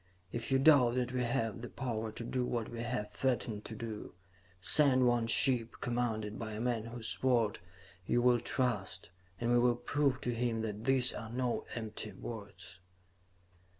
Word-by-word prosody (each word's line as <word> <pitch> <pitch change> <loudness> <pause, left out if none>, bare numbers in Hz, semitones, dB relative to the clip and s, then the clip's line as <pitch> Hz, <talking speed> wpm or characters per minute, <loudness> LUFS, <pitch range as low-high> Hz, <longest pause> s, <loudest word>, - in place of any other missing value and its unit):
If 120 +3 -4
you 135 - +5
doubt 135 -4 +6
that 125 -1 0
we 125 0 -1
have 115 -2 -1
the 120 - -6
power 115 -4 -3
to 115 - -6
do 125 +2 -1
what 120 -2 -2
we 120 - -7
have 115 -3 -3
threatened 120 -5 -1
to 110 - -7
do, 110 -4 -7 0.4
send 130 +5 +5
one 120 -2 +2
ship, 120 -1 +2
commanded 110 -4 -2
by 110 -2 -5
a 105 - -5
man 115 -2 -1
whose 115 -1 -6
word 120 -5 +2 0.5
you 120 - +2
will 120 0 +4
trust, 115 -8 -2 0.3
and 120 0 0
we 120 - +5
will 120 0 +4
prove 140 +3 0
to 120 - -1
him 115 -1 -1
that 105 0 -4
these 130 -2 +4
are 110 - -6
no 125 +1 -1
empty 110 -2 -4
words.'" 100 -5 -8
120 Hz, 175 wpm, -33 LUFS, 110-125 Hz, 0.5 s, doubt